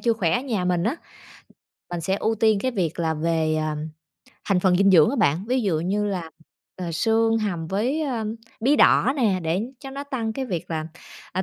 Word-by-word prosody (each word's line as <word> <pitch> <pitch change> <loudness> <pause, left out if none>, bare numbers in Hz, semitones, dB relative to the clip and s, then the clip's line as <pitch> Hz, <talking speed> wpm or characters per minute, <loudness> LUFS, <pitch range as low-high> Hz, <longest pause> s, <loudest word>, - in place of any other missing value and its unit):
chưa 235 - +2
khỏe 185 -7 0
ở 245 - +2
nhà 225 -9 -2
mình 180 0 +1
á. 255 +9 0 0.9
Mình 175 -1 -4
sẽ 190 +4 0
ưu 220 +2 0
tiên 220 -2 +3
cái 260 +3 -1
việc 175 -7 -2
là 160 -1 +1
về, 160 0 0
à, 155 -1 -1 0.7
thành 195 -3 +1
phần 180 -1 +3
dinh 195 +1 +4
dưỡng 160 -5 +6
á - - -2
bạn, 165 +8 +2
ví 255 0 +2
dụ 165 -6 0
như 205 +4 0
là, 180 -5 -3 0.5
ờ, 175 -2 -4
xương 225 +5 +2
hầm 175 -7 -2
với, 245 - -1
ơ, 245 -6 -2 0.4
bí 275 +6 +3
đỏ 260 - +5
nè, 205 -8 +1
để 165 +4 0 0.2
cho 270 -2 -8
nó 280 +1 -6
tăng 235 -6 -3
cái 265 +4 -3
việc 175 -8 -4
là, 155 -1 -2 0.5
à, 185 +1 -1
195 Hz, 215 wpm, -24 LUFS, 170-230 Hz, 0.9 s, dưỡng